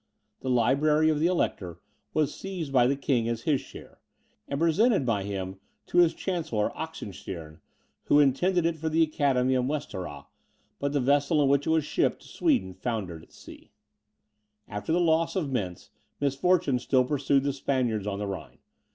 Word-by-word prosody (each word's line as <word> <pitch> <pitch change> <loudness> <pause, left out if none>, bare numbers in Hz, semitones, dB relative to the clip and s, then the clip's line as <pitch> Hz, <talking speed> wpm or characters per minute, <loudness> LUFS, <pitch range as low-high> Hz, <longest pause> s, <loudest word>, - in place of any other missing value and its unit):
The 130 - -4
library 150 +6 +3
of 155 -1 +1
the 160 - +3
Elector 95 - -1 0.3
was 150 -2 0
seized 180 -7 -6
by 125 -2 +5
the 140 - +1
king 125 -4 0
as 115 -1 -3
his 145 -5 +1
share, - - -13 0.5
and 140 - -3
presented 185 - +3
by 110 -5 +1
him 95 -1 -5 0.3
to 175 - +1
his 170 -2 +5
chancellor, 160 - -1
Oxenstiern, 95 - -7 0.5
who 145 - +5
intended 160 +6 +3
it 165 -1 0
for 160 +1 -2
the 165 +1 +3
Academy 135 -4 +1
of 125 -1 +1
Westerrah, 95 - -4 0.5
but 140 0 -1
the 145 - +2
vessel 145 +4 +2
in 135 - +3
which 140 +1 +2
it - - +1
was 160 -2 +2
shipped - - 0
to - - -15
Sweden 275 - 0
foundered 95 -8 -4
at - - -19
sea. - - -14 1.0
After 105 +9 -4
the 170 - +3
loss 165 -1 +2
of 160 -8 -1
Mentz, 95 -9 -4 0.3
misfortune 145 0 +2
still 130 +1 +2
pursued 140 0 +1
the 140 0 0
Spaniards 125 -7 -1
on 100 -1 -2
the 105 - -3
Rhine. 90 -11 -7
140 Hz, 175 wpm, -27 LUFS, 115-160 Hz, 1.0 s, by